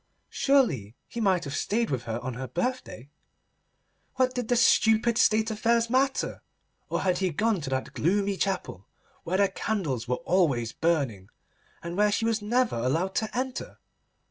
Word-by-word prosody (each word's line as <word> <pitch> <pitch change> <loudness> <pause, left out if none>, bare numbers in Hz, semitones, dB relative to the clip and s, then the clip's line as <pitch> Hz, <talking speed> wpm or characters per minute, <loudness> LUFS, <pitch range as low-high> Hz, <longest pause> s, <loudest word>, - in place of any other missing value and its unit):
Surely 160 - +1
he 235 - -5
might 190 -4 +2
have 140 0 -5
stayed 230 +5 0
with 125 -2 -2
her 115 0 -3
on 130 0 -4
her 130 +2 -5
birthday. 245 - -3 1.1
What 255 -1 +2
did 245 -3 -3
the 245 - +2
stupid 230 0 +4
State 220 +1 +3
affairs 230 +1 +1
matter? 265 +1 0 0.5
Or - - -1
had 185 -2 +1
he 190 -1 +1
gone 205 +3 0
to 140 - -5
that 130 0 -3
gloomy 200 +4 +1
chapel, 185 - -3 0.4
where 180 +3 0
the 200 0 +4
candles 150 - -3
were 125 - +1
always 140 -11 +2
burning, 135 - -1 0.5
and 170 +1 -5
where 210 +1 +3
she 225 +2 0
was 225 -1 0
never 240 - +1
allowed 160 +11 0
to 220 +1 -2
enter? 255 0 -4
195 Hz, 165 wpm, -27 LUFS, -, 1.1 s, stupid